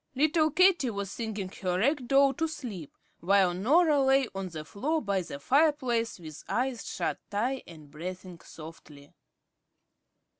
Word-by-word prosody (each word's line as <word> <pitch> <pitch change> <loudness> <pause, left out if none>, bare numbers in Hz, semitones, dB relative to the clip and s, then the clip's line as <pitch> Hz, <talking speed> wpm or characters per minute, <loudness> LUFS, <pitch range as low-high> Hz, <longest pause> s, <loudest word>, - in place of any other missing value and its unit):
Little 310 +3 +3
Katie 335 -4 +4
was 200 -3 -4
singing 215 -4 -4
her 180 -2 0
rag 260 +5 +1
doll 275 0 +4
to 325 +5 -1
sleep, 225 - -8 0.2
while 190 0 +3
Norah 290 - +3
lay 270 -1 +3
on 195 -1 -4
the 155 -2 -7
floor 290 - -1
by 200 -7 -1
the 155 -5 -8
fireplace 260 - +1
with 155 -3 -10
eyes 250 -1 -1
shut - - -3
tight 245 +6 -1
and 155 -4 -13
breathing 180 +2 -8
softly. 155 -3 -13
220 Hz, 145 wpm, -28 LUFS, 180-275 Hz, 0.2 s, Katie